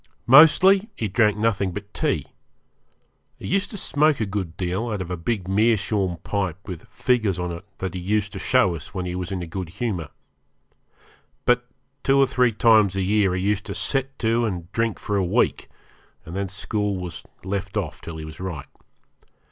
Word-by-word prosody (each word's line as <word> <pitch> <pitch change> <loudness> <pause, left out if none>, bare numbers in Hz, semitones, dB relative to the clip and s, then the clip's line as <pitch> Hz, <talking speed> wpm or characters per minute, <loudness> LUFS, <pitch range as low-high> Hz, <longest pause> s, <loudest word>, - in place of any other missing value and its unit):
Mostly 165 - +7
he 110 - -2
drank 105 +1 +2
nothing 100 -4 0
but 105 +2 -8
tea. - - 0 1.1
He - - -10
used 195 +1 0
to 205 - -7
smoke 150 -4 +2
a 110 - +1
good 95 -4 -4
deal 95 +6 -2
out 105 -3 -2
of 90 -1 -5
a - - -1
big 90 +2 -2
meerschaum 100 -3 +1
pipe 95 -4 -2
with 90 -4 -7
figures 110 -7 0
on 90 -1 -3
it 85 +3 -8
that 95 -2 -4
he 95 - -4
used 100 +2 -1
to - - -5
show 90 - +3
us 80 +4 -10
when 90 -1 -2
he 90 - -3
was 90 +1 -4
in 95 -2 -3
a - - -4
good 90 +1 -5
humour. 90 -5 -3 1.4
But 125 0 +2 0.3
two 135 0 +3
or 135 - +6
three 125 -2 +2
times 110 -3 +4
a 95 - 0
year 100 -1 +2
he 95 - -2
used 105 -1 0
to - - -4
set 135 0 0
to 115 0 +1
and 90 -6 -3
drink 115 -1 0
for 105 - -2
a 95 - +2
week, 90 - +1 0.6
and 85 - -8
then 100 0 -2
school 100 +1 -2
was 90 -4 -5 0.2
left 95 +1 -3
off 90 -7 -3
till 80 -1 -7
he 80 - -6
was 80 -1 -10
right. 85 -6 -5
100 Hz, 195 wpm, -23 LUFS, 90-115 Hz, 1.4 s, Mostly